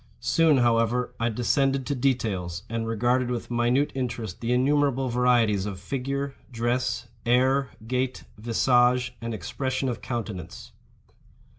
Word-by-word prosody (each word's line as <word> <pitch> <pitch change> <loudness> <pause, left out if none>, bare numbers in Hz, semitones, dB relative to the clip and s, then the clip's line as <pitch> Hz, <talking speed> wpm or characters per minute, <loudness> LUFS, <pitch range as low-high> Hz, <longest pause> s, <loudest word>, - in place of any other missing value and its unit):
Soon, 140 +5 +3
however, 120 0 +2
I 115 +1 +1
descended 135 +4 +1
to 145 - -1
details, 105 -10 -1
and 115 -1 -2
regarded 120 +3 +1
with 120 -1 -4
minute 120 +4 +2
interest 115 -7 -4
the 115 0 -1
innumerable 135 0 +2
varieties 120 -5 +2
of 95 -3 -5
figure, 140 +6 -3 0.2
dress, 120 +1 -1 0.2
air, 130 +3 +3 0.2
gait, 130 +2 -2
visage, 120 +2 +2
and 115 0 -4
expression 130 +6 -2
of 120 - -4
countenance. 105 -8 -6
125 Hz, 125 wpm, -26 LUFS, 115-130 Hz, 0.2 s, Soon